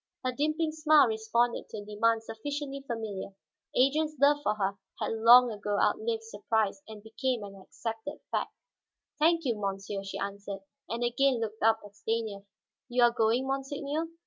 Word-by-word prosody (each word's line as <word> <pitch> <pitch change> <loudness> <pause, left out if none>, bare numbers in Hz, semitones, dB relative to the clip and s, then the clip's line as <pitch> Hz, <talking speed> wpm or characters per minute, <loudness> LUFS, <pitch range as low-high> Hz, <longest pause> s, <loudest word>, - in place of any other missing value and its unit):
Her 255 - +2
dimpling 310 +4 0
smile 310 -2 +5
responded 230 +1 0
to - - -7
a 205 - -7
demand 225 +2 +1
sufficiently 275 +5 -5
familiar. 220 -6 -5 0.4
Adrian's 300 +4 +2
love 290 +1 +5
for 210 -7 0
her 200 -1 -1 0.2
had - - -1
long 235 +2 +7
ago 205 -1 -2
outlived 225 0 +1
surprise 220 +2 -1
and 215 -2 -10
become 230 +1 -2
an 195 -1 -10
accepted 225 +7 -6
fact. - - -1 0.7
"Thank 330 +1 +3
you, 240 -3 +1
monsieur," 195 0 -3
she 195 - -5
answered, 200 0 -5 0.3
and 235 +2 -2
again 250 +1 +2
looked 220 -1 -4
up 225 0 +4
at 205 0 -14
Stanief. 220 -2 -3 0.4
"You 245 0 +3
are 240 - +6
going, 235 +2 +2
monseigneur? 280 +3 -2
230 Hz, 160 wpm, -29 LUFS, 210-275 Hz, 0.7 s, long